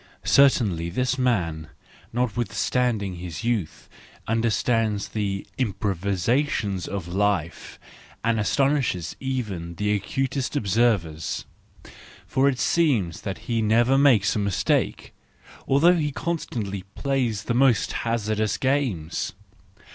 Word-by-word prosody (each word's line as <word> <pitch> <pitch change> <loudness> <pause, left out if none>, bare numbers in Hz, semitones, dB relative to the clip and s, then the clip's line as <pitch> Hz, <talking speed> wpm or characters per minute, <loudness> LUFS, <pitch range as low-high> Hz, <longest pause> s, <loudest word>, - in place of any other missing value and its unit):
—Certainly 105 -12 +3
this 125 +7 -1
man, 85 -11 0 0.4
notwith¬ 120 -1 -1
standing 110 -7 0
his 85 +2 -6
youth, 115 -8 -2 0.4
understands 115 -2 +1
the 100 -2 -2
improvisation 100 - 0
of 100 -4 -4
life, 95 -2 -1 0.5
and 115 -1 +1
astonishes 120 - +1
even 105 -11 -4
the 105 +3 0
acutest 135 +7 -2
observers. 100 - 0 0.8
For 135 +1 +2
it 130 - -2
seems 120 - +1
that 95 - -4
he 115 -2 +1
never 115 +4 +3
makes 130 -8 +4
a - - 0
mistake, 100 -3 0 0.5
although 155 +6 +5
he 150 -2 0
constantly 115 - -3
plays 125 -7 -1
the 120 - -1
most 125 -2 +3
hazardous 110 -2 -1
games. 130 - -1
110 Hz, 105 wpm, -24 LUFS, 95-130 Hz, 0.8 s, although